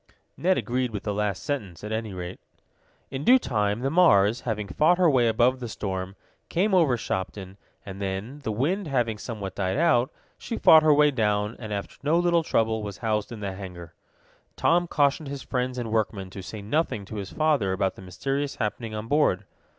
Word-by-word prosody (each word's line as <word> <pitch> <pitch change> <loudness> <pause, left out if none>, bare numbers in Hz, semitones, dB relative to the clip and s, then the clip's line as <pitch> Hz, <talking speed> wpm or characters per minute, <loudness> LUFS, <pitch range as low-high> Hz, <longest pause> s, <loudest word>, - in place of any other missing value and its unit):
Ned 185 +2 +2
agreed 125 +1 -1
with 105 -3 -6
the 105 - -2
last 105 -2 -2
statement, 105 - -4
at 105 - -5
any 110 -1 -2
rate. 90 -1 -6 0.7
In 135 +1 -4
due 255 +8 +7
time 105 - -1
the 135 +1 0
Mars, 115 - +4
having 105 -4 -3
fought 160 - +3
her 180 -1 +4
way 130 -6 +4
above 120 +3 +3
the 120 -2 -5
storm, 95 -2 -4 0.3
came 195 +4 +1
over 160 -9 +4
Shopton, 95 -2 -4 0.3
and 95 0 -8
then, 100 +8 -4
the 125 -6 -3
wind 160 - -1
having 120 -6 0
somewhat 105 -5 -5
died 95 +3 -1
out, 135 -6 +3 0.3
she 230 - -4
fought 160 - +8
her 155 0 +4
way 150 0 +5
down, 105 -3 0
and, 110 -3 -7
after 100 -1 -5
no 150 +4 +2
little 175 -1 +3
trouble, 110 -7 0
was 100 -3 -6
housed 105 0 0
in 115 -3 -7
the 100 -2 -3
hangar. 90 -4 -9 0.6
Tom 175 +1 +2
cautioned 145 0 +1
his 140 -1 -6
friends 125 0 -2
and 115 -3 -4
workmen 105 -4 -1
to 95 - -7
say 100 +2 -8
nothing 110 -3 -1
to 105 - -7
his 100 -2 -5
father 150 -11 +1
about 95 0 0
the - - -13
mysterious 135 +10 -3
happening 110 +1 -3
on 105 +1 -5
board. 130 -9 +2
110 Hz, 195 wpm, -26 LUFS, 100-145 Hz, 0.7 s, fought